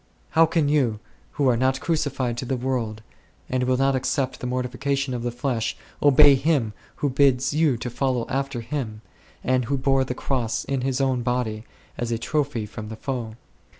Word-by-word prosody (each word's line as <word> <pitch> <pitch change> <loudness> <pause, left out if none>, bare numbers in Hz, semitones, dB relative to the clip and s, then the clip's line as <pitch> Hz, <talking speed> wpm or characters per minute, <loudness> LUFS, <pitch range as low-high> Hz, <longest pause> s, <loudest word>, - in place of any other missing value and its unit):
How 165 0 +5
can 160 -2 +1
you, 130 -8 +2 0.3
who 140 -2 +1
are 125 - +4
not 130 +2 +1
crucified 140 -7 -1
to 130 - -4
the 130 +1 -1
world, 120 -4 -2 0.4
and 130 0 0
will 130 0 +2
not 135 +1 +3
accept 130 +1 -1
the 125 - -4
mortification 130 +2 -1
of 120 - -3
the 120 - -1
flesh, 120 -1 -2 0.2
obey 145 0 +7
Him 135 -5 +1 0.2
Who 145 - 0
bids 135 0 +3
you 150 -5 +3
follow 125 0 -1
after 135 -2 -2
Him, 115 -3 -4 0.4
and 130 -1 +2
Who 140 +4 0
bore 135 0 +2
the 125 -1 -4
Cross 125 -5 -1
in 135 -2 -1
His 135 +1 0
own 130 -2 +1
body, 120 -3 -1 0.3
as 120 -1 -2
a 115 - +1
trophy 140 -1 -1
from 105 0 -8
the 110 - -6
foe 115 -3 -4
130 Hz, 185 wpm, -24 LUFS, 120-140 Hz, 0.4 s, obey